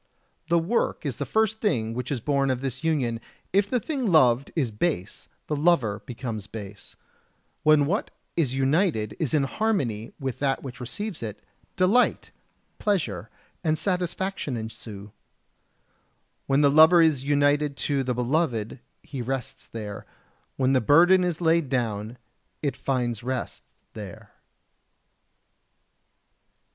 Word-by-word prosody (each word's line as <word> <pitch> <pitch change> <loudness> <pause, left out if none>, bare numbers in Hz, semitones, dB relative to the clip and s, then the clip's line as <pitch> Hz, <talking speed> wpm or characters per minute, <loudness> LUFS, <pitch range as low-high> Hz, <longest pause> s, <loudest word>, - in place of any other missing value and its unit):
The 170 - +3
work 170 +1 0
is 135 -5 -2
the 140 - -3
first 220 - +1
thing 115 - 0
which 125 +2 -4
is 135 - -1
born 140 +2 +1
of 130 -1 -1
this 135 +1 -4
union; 130 -8 0 0.3
if 200 +1 +3
the 250 - +1
thing 260 - -2
loved 130 -5 +4
is 135 -9 0
base, 105 - -2 0.2
the 150 - -2
lover 140 - +2
becomes 115 -4 -5
base. 105 -2 -9 0.7
When 155 -2 +5
what 195 +9 -1 0.3
is 140 -7 +1
united 135 - +1
is 155 -2 0
in 145 - +3
harmony 135 - -1
with 135 -3 -4
that 135 -1 0
which 125 -2 -8
receives 195 - -5
it, 110 -3 -6 0.3
delight, 200 +7 +2 0.5
pleasure 115 - -1 0.3
and 155 -2 +1
satisfaction 180 -4 -2
ensue. 110 -2 -8 1.4
When 140 +1 +3
the 140 -1 +5
lover 160 +4 +7
is 150 -5 +2
united 145 0 +2
to 140 -2 +1
the 125 -1 -1
beloved 125 -3 0 0.2
he 135 -4 -6
rests 130 0 -4
there; 105 -3 -7 0.5
when 130 0 +2
the 130 - +3
burden 175 - +6
is 175 -2 -1
laid 165 -3 +2
down 115 -3 -2 0.5
it 140 -4 0
finds 125 -4 -1
rest 130 0 -4 0.3
there. 105 -4 -9
135 Hz, 135 wpm, -26 LUFS, 120-165 Hz, 1.4 s, lover